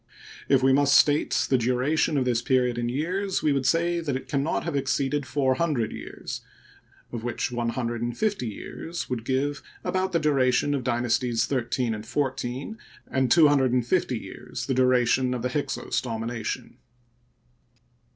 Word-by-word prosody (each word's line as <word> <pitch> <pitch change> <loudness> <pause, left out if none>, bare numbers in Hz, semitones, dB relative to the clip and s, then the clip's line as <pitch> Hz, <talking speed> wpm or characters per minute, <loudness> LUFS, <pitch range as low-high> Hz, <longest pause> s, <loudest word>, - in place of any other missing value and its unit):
If 135 -2 +4
we 130 0 +5
must 140 0 +5
state 145 0 +3
the 130 - +4
duration 130 +6 +1
of 130 - +1
this 120 -2 +1
period 125 -2 +1
in 120 0 -1
years, 180 +9 -1
we 150 - +3
would 135 -1 0
say 170 +3 +2
that 150 -5 -2
it 130 - -5
can 140 -2 0
not 150 - -1
have 170 -3 -3
exceeded 135 +1 0
four 135 -2 +1
hundred 130 -6 0
years, - - -7 0.7
of 115 -2 -5
which 120 +1 -2
one 120 -1 -1
hun 125 +1 -2
dred 115 0 -3
and 120 0 -3
fifty 205 - 0
years 160 +9 -6
would 120 -3 -2
give 140 +4 -1 0.2
about 190 0 0
the 170 - +2
duration 140 -2 +2
of 135 -3 -1
Dynasties 120 -1 +1
XIII 125 -2 -1
and 105 -1 -5
XIV 135 - -3 0.3
and 130 -1 +1
two 165 -3 +7
hundred 135 -4 +3
and 125 -2 +2
fifty 130 -5 +1
years 110 +4 -7
the 135 - 0
duration 125 0 +3
of 120 - -4
the 125 - 0
Hyksos 145 +3 -2
domination. 115 -1 -4
130 Hz, 175 wpm, -26 LUFS, 120-145 Hz, 0.7 s, two